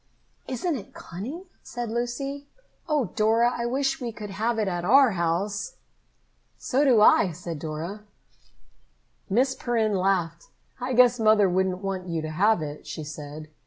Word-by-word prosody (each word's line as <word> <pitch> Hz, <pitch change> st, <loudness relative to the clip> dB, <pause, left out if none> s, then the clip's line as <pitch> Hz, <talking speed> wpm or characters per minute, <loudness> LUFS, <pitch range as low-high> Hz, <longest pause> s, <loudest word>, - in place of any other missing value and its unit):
"Isn't 290 Hz, +6 st, -2 dB
it 205 Hz, -, -11 dB
cunning!" 255 Hz, -, -7 dB, 0.2 s
said 240 Hz, -2 st, -5 dB
Lucy. 275 Hz, +4 st, -3 dB, 0.4 s
"Oh, 290 Hz, -, +1 dB
Dora, 225 Hz, +3 st, +3 dB
I 235 Hz, 0 st, -2 dB
wish 270 Hz, +4 st, -1 dB
we 240 Hz, -2 st, -3 dB
could 210 Hz, -2 st, -8 dB
have 225 Hz, +4 st, -1 dB
it 215 Hz, -2 st, 0 dB
at 175 Hz, -2 st, -2 dB
our 260 Hz, +5 st, +6 dB
house." 190 Hz, -, -2 dB, 0.8 s
"So 275 Hz, +1 st, 0 dB
do 250 Hz, -7 st, +5 dB
I," 195 Hz, -3 st, +6 dB
said 165 Hz, -1 st, -6 dB
Dora. 160 Hz, +7 st, -5 dB, 1.3 s
Miss 255 Hz, +6 st, +2 dB
Perrin 225 Hz, -5 st, 0 dB
laughed. 180 Hz, -3 st, 0 dB, 0.3 s
"I 255 Hz, +1 st, -2 dB
guess 245 Hz, 0 st, +5 dB
Mother 215 Hz, -2 st, +5 dB
wouldn't 185 Hz, +1 st, 0 dB
want 190 Hz, -2 st, -3 dB
you 165 Hz, -2 st, -2 dB
to 155 Hz, -, -4 dB
have 195 Hz, +2 st, +2 dB
it," 150 Hz, 0 st, -7 dB
she 155 Hz, -, -6 dB
said. 150 Hz, 0 st, -8 dB
215 Hz, 155 wpm, -26 LUFS, 175-245 Hz, 1.3 s, our